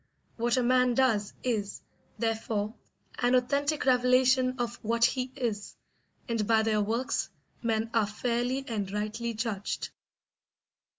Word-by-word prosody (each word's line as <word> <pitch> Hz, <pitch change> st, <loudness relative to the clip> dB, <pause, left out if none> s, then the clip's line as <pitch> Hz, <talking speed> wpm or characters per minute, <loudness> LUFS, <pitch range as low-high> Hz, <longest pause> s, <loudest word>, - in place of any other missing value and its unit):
What 240 Hz, +1 st, +1 dB
a 255 Hz, -, +2 dB
man 250 Hz, 0 st, +3 dB
does 225 Hz, -6 st, +2 dB
is, 215 Hz, -5 st, -2 dB, 0.4 s
therefore, 220 Hz, -2 st, -1 dB, 0.5 s
an 245 Hz, +1 st, +3 dB
authentic 280 Hz, +4 st, +1 dB
revelation 255 Hz, 0 st, +4 dB
of 240 Hz, -1 st, -2 dB
what 230 Hz, +1 st, +2 dB
he 255 Hz, +1 st, -1 dB
is, 225 Hz, -6 st, -3 dB, 0.5 s
and 230 Hz, -4 st, -1 dB
by 220 Hz, -1 st, +4 dB
their 215 Hz, -1 st, +2 dB
works 230 Hz, +6 st, -1 dB, 0.3 s
men 225 Hz, -1 st, 0 dB
are 225 Hz, -3 st, +3 dB
fairly 245 Hz, +4 st, -1 dB
and 205 Hz, -4 st, -2 dB
rightly 215 Hz, +3 st, -3 dB
judged. 215 Hz, -3 st, -3 dB
235 Hz, 125 wpm, -29 LUFS, 220-255 Hz, 0.5 s, revelation